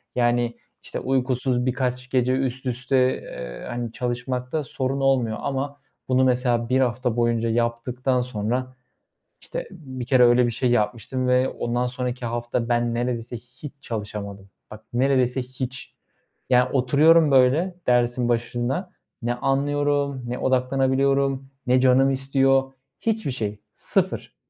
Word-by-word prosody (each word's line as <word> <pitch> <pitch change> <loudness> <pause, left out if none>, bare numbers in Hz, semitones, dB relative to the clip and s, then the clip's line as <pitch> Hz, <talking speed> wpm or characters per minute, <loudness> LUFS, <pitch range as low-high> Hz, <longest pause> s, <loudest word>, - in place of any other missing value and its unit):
Yani, 120 -1 +1 0.3
işte, - - -5
uykusuz 130 -1 0
birkaç 125 0 -2
gece 125 0 +2
üst 130 -1 -2
üste, 125 +1 0 0.2
eee, - - -8
hani, 120 -1 -4
çalışmakta 125 +4 -3
sorun 135 0 -2
olmuyor 130 -5 +2
ama 140 +1 -3 0.3
bunu 130 0 +3
mesela 125 -2 +1
1 130 +1 +3
hafta 125 -2 0
boyunca 115 -1 +1
yaptıktan 120 +2 0
sonra... 125 +2 -3 0.7
İşte, - - -6
bir 130 -5 -7
kere 130 0 +5
öyle 120 +1 +5
bir 120 - 0
şey 125 +2 0
yapmıştım 120 +3 0
ve 125 +1 +3
ondan 120 +1 -2
sonraki 125 -1 -4
hafta 120 0 -2
ben 120 0 +1
neredeyse 120 0 -2
hiç 125 +5 -11
çalışamadım. 100 -4 -6 0.2
Bak 110 +1 -10
neredeyse 130 0 +2
hiç. 130 0 -7 0.6
Yani 125 0 +4
oturuyorum, 150 +4 +5
böyle, 135 +8 +4
dersin 120 0 +2
başında; 120 +9 -1 0.3
ne 120 +1 0
anlıyorum, 140 +1 0
ne 125 +1 -3
odaklanabiliyorum, 135 +1 +1 0.2
ne 125 +1 +4
canım 130 +1 +5
istiyor. 135 0 +2 0.3
Hiçbir 220 -9 -1
şey 105 -4 -4 0.2
sıfır. - - -2
125 Hz, 130 wpm, -24 LUFS, 120-135 Hz, 0.7 s, kere